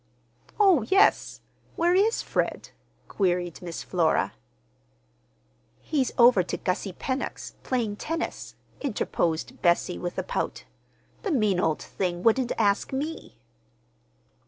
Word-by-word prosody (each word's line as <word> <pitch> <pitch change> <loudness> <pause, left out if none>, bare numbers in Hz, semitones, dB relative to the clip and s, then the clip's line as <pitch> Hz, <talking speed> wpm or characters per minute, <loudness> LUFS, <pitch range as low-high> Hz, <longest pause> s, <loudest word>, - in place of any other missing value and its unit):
"Oh, 385 -9 +6
yes, 390 - +3 0.3
where 345 +1 +2
is 415 +5 +2
Fred?" - - -2 0.4
queried 175 -3 -1
Miss 170 -2 -6
Flora. 165 -4 +1 1.5
"He's 280 -5 -1
over 240 -5 +7
to 175 - -4
Gussie 185 0 -2
Pennock's, 260 +8 -4
playing 230 -5 -2
tennis," 325 +6 -4 0.3
interposed 175 - -2
Bessie, 175 0 +2
with 175 -1 -5
a - - -1
pout. - - -3 0.6
"The 420 - -3
mean 215 - +2
old 160 -3 0
thing 175 -2 -3
wouldn't 240 +2 +3
ask 205 -2 +1
me!" 280 - -5
215 Hz, 110 wpm, -26 LUFS, 180-285 Hz, 1.5 s, over